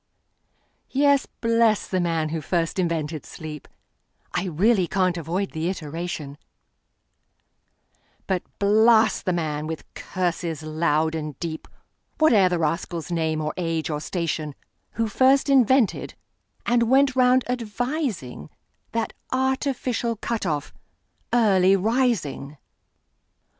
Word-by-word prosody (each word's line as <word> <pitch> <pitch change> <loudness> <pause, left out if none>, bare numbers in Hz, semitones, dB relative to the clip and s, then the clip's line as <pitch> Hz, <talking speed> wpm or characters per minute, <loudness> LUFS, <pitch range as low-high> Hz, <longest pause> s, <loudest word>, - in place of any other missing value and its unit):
Yes; 280 0 +3
bless 230 -2 +1
the 185 - -1
man 165 -3 0
who 160 0 -3
first 170 +3 -1
invented 160 -4 -1
sleep(I 155 +4 -9
really 185 +3 +2
can't 185 -1 +1
avoid 175 +4 -2
the 160 +2 -2
iteration),But 165 +2 -9 0.2
blast 220 +2 +4
the 185 - +1
man, 155 -3 -2
with 160 0 -5
curses 170 -4 -3
loud 155 0 +1
and 155 -3 -5
deep, 160 -2 -5 0.5
Whate'er 220 -12 +5
the 175 - 0
rascal's 165 +1 -2
name, 160 -2 0
or 155 0 -2
age, 165 -3 -2
or 150 0 -3
station, 155 -4 -3 0.4
Who 230 0 0
first 265 +6 +3
invented, 260 -3 +3 0.5
and 235 -1 +2
went 270 0 +4
round 255 0 +4
advising, 240 - -3 0.4
That 230 -1 -1 0.2
artificial 260 -3 0
cut 225 -1 -3
off, 150 -3 -2 0.6
Early 195 -5 +4
Rising! 200 - 0
185 Hz, 105 wpm, -24 LUFS, 160-230 Hz, 0.6 s, Whate'er